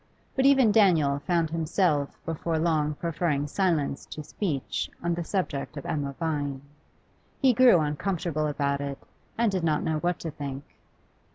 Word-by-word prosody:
But 265 0 +4
even 265 -5 +5
Daniel 165 -10 +4
found 170 -3 +1
himself 160 -3 0
before 165 0 -2
long 155 -2 +1
preferring 160 -3 -1
silence 150 -4 0
to 155 - -7
speech 150 -3 -3
on 170 0 +1
the 170 0 -2
subject 160 -7 -3
of 140 - -6
Emma 140 -2 -2
Vine. 145 -4 -2 0.8
He 265 -3 +4
grew 245 -4 +6
uncomfortable 155 0 -1
about 140 -1 -1
it, 140 -1 -4 0.4
and 230 -2 +2
did 185 -3 -1
not 155 -2 +1
know 155 -1 0
what 175 +2 0
to 165 - -4
think. 140 -2 -6
160 Hz, 155 wpm, -27 LUFS, 145-180 Hz, 0.8 s, grew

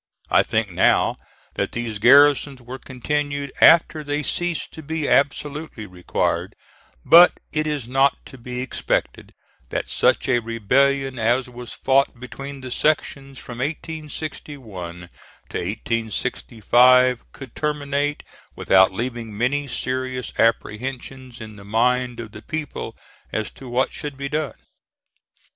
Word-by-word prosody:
I - - +6
think - - -1
now - - +3 0.4
that - - -2
these 115 -3 -4
garrisons 140 +3 +5
were 125 +2 -9
continued 140 +2 -3
after 160 -2 +6
they 145 +1 -2
ceased 175 +2 -2
to 160 - -8
be 155 0 -3
absolutely 145 -3 0
required; 90 -2 -2 0.5
but 175 +1 +8 0.2
it 155 0 0
is 145 -6 -3
not 135 +2 +3
to 130 - -12
be 125 +1 -5
expected 130 - -2 0.4
that - - -3
such - - +2
a 120 - +3
rebellion 130 +4 +1
as 120 +3 +1
was 120 -1 -9
fought 135 -2 +1
between 135 +2 -8
the 130 -1 -7
sections 140 -2 -1
from 120 -1 -9
1861 145 - -6 0.5
to - - -4
1865 120 +4 +2
could 130 -4 -11
terminate 145 -1 -1 0.3
without 95 0 +4
leaving 115 0 -5
many 140 +5 0
serious 130 -1 -3
apprehensions 125 +3 -2
in 110 -2 -10
the 100 - -12
mind 125 +3 +1
of 110 -3 -7
the 105 - -11
people 155 +2 -5 0.3
as 110 -1 -3
to 130 - -11
what 125 +2 0
should 145 -2 -6
be 140 0 -4
done. 150 -1 -2
130 Hz, 130 wpm, -22 LUFS, 120-145 Hz, 0.5 s, but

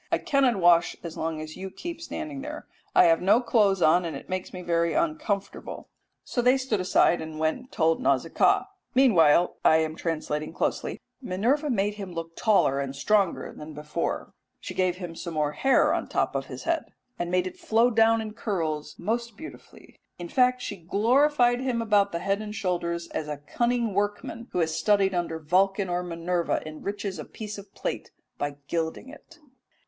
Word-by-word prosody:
I - - +4
cannot 270 -4 +2
wash 175 -2 +4
as 170 -2 -6
long 160 -1 -3
as 155 0 -8
you 190 +1 -6
keep 335 - -7
standing 310 -4 -5
there. 300 +2 -7 0.3
I - - +8
have 165 -1 +4
no 195 +5 +5
clothes 205 -6 +2
on, 175 +3 +5
and 165 -4 -4
it - - -13
makes 185 0 -3
me 180 -1 -7
very 170 -1 +1
uncomfortable." 305 - -2 0.3
So 245 - -1
they 250 +2 +4
stood 260 -6 -1
aside 180 -1 +3
and 160 -1 -7
went 155 0 +1
and 255 +1 -16
told 165 -1 +1
Nausicaa. 140 - +2 0.3
Meanwhile 175 - +5
(I 160 - +6
am 160 0 -1
translating 155 -2 -3
closely), - - -2 0.2
"Minerva 250 +8 0
made 205 -4 +1
him 185 -3 -6
look 165 0 -6
taller 195 - +3
and 140 -1 -3
stronger 195 +5 +1
than 150 0 -9
before; 150 +3 -3 0.3
she - - -7
gave 185 -1 +1
him 175 -3 -7
some 165 0 -6
more 150 -1 +1
hair 270 - +3
on - - -1
the - - -20
top - - 0
of - - -3
his - - -8
head, 335 -1 0 0.3
and 175 - -2
made 180 0 +1
it 185 - -7
flow 230 +3 +3
down 225 0 +4
in 215 -1 -6
curls 160 -9 -3
most 235 0 -3
beautifully; 320 +4 -12 0.2
in 175 -1 -7
fact 250 -1 +2
she 205 - -5
glorified 245 - +3
him 255 -2 -1
about 205 -3 +3
the 170 - -2
head 195 +4 -1
and 210 0 -6
shoulders 170 -4 -2
as 150 - -4
a 150 -1 -4
cunning 235 - -1
workman 205 +4 -2
who - - -4
has 160 -2 +1
studied 200 0 +2
under 170 -2 -1
Vulcan 190 +5 +1
or 175 0 0
Minerva 175 0 -1
enriches 195 +4 -5
a - - -4
fine - - -20
piece 210 -1 -6
of 200 0 -13
plate - - -4 0.3
by 145 0 -2
gilding 165 +7 -2
it." 305 +4 -14
190 Hz, 190 wpm, -26 LUFS, 165-230 Hz, 0.3 s, I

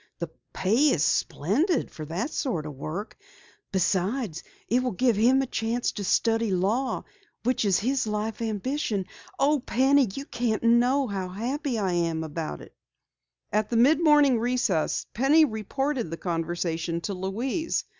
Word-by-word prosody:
The - - -5 0.2
pay 230 +11 +3
is 155 - +2
splendid 255 - +1
for 155 - -7
that 170 - -3
sort 200 - -2
of 150 - -6
work. 155 - -6 0.6
Besides, 190 - 0 0.3
it 245 +3 +2
will 250 -3 -1
give 240 +3 +2
him 250 +6 +4
a - - -1
chance 235 0 -1
to 205 - -5
study 225 +3 +2
law, 205 +8 0 0.4
which 250 -2 +1
is 195 -3 +3
his 255 +2 0
life 215 +1 -3
ambition. 220 -1 -2 0.3
Oh, 290 +2 +3
Penny, 265 0 +3
you 275 - -5
can't 230 -6 -2
know 245 +4 +4
how 195 -5 -4
happy 245 +6 -2
I 195 -4 0
am 165 -2 0
about 160 0 -5
it!" - - -14 0.8
At 210 0 +1
the 235 - 0
mid 295 +8 +4
morning 295 -6 +5
recess, 230 -9 0
Penny 290 +6 +5
reported 260 - -2
the 165 - -5
conversation 170 -1 -2
to 200 - -3
Louise. 230 - -2
225 Hz, 155 wpm, -26 LUFS, 185-260 Hz, 0.8 s, morning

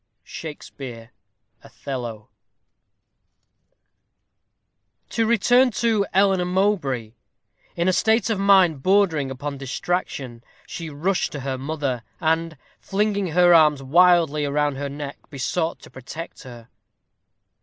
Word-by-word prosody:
SHAKSPEARE: 130 -6 -9 0.5
Othello. 120 -6 -7 2.8
To 225 -1 +1
return 245 +3 +4
to 220 -2 +1
Eleanor 190 -1 +3
Mowbray. 180 - 0 0.6
In 170 +1 0
a 185 - +3
state 225 +4 +2
of 210 - -1
mind 190 -7 +4
bordering 180 -6 +2
upon 140 +1 -5
distraction, 135 -4 -4 0.2
she 165 -2 -7
rushed 170 +6 -1
to 145 - -5
her 130 -1 -3
mother, 140 -3 -3 0.2
and, 160 -1 0 0.2
flinging 200 -1 -1
her 175 +1 +4
arms 150 -4 +5
wildly 165 0 +4
round 145 0 0
her 140 0 -4
neck, 140 0 -7
besought 160 +5 -2
her - - -25
to - - -13
protect 155 +6 -9
her. 120 -3 -12
160 Hz, 110 wpm, -23 LUFS, 135-190 Hz, 2.8 s, arms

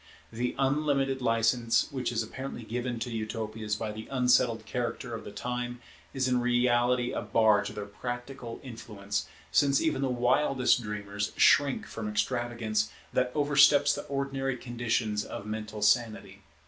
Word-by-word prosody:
The 120 +2 -2
unlimited 135 -1 +1
license 115 +1 +2
which 130 -3 -2
is 115 -1 0
apparently 130 +2 -7
given 120 +2 -3
to 120 - -3
Utopias 110 -1 -3
by 110 0 -4
the 110 +1 -8
unsettled 125 -3 +2
character 120 +1 -3
of 115 - -5
the - - -8
time 125 +2 -4 0.3
is 130 -1 0
in 125 -1 +2
reality 120 0 +2
a - - -2
bar 110 -2 +3
to - - -5
their 105 - -6
practical 120 +3 -6
influence, 105 -5 -5 0.2
since 140 -1 +4
even 155 -4 0
the 135 - +1
wildest 125 +1 +2
dreamers 105 -1 -4
shrink 140 -2 +4
from 105 -2 -5
extravagance 110 -1 -1 0.2
that 125 0 +1
oversteps 145 0 +5
the - - -3
ordinary 135 -1 -2
conditions 120 -3 -1
of 100 - -7
mental 110 0 -5
sanity. 105 -3 +1
120 Hz, 145 wpm, -29 LUFS, 110-130 Hz, 0.3 s, oversteps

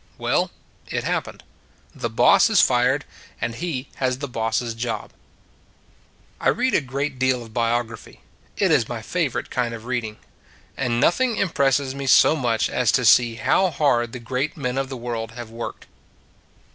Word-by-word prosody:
Well, - - 0 0.4
it - - -3
happened. - - -3 0.5
The - - -4
boss - - +5
is - - +4
fired: 130 +3 +3 0.3
and 120 - -2
he 140 -2 -4
has 130 -1 0
the 140 +1 -5
boss 115 -2 -1
s 120 -1 -4
job. 115 -2 -4 1.3
I - - +2
read 255 0 +1
a - - +3
great 135 0 -4
deal 130 -1 +1
of 110 -1 -14
biography: 115 -1 -2 0.4
it - - +2
is - - +3
my - - -5
favorite - - -2
kind 120 -2 -1
of 115 0 -11
reading. 120 -4 -3 0.6
And 120 -1 -1
noth 175 - +3
ing 250 -3 +2
impresses 140 - +1
me 140 0 -5
so 140 - +6
much 120 -7 0
as 125 -4 +1
to 130 -2 +2
see 115 +1 +5
how 185 +10 +2
hard 120 -8 +1
the 125 - -7
great 130 +6 -3
men 130 -2 -2
of 135 -1 -3
the 130 - -5
world 115 -2 -5
have 120 -2 -8
worked. 115 +1 -7
125 Hz, 170 wpm, -23 LUFS, 115-135 Hz, 1.3 s, so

